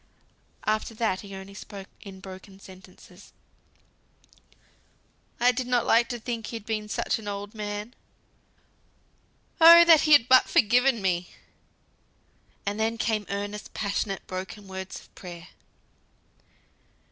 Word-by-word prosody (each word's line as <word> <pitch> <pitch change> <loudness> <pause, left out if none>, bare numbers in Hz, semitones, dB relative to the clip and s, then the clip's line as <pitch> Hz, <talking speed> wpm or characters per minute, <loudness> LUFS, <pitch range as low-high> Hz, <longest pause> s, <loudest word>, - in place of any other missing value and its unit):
After 215 +1 -1
that 215 -4 -1
he 200 -1 -10
only 190 +1 -10
spoke 195 -1 -10
in 190 -2 -11
broken 190 0 -12
sentences. 185 0 -16 2.1
"I 245 +1 +5
did 250 +1 -4
not 245 -1 +1 0.4
think 230 -3 -4
he'd 225 -3 -7
been 215 -1 -3
such - - -1
an 215 - -10
old 205 0 -5
man, 210 +1 -5 1.7
Oh! 335 +1 +10
that 325 -2 +7
he 305 -1 +4
had 250 -5 +6
but 255 0 +5
forgiven 240 0 +3
me," 180 -1 -1 1.4
and 205 +2 -3
then 225 +1 0
came 215 -3 -1
earnest, 205 +1 -5
passionate, 200 -1 -3
broken 190 +2 -7
words 190 0 -7
of - - -22
prayer. 175 -2 -11
205 Hz, 120 wpm, -26 LUFS, 195-230 Hz, 2.1 s, Oh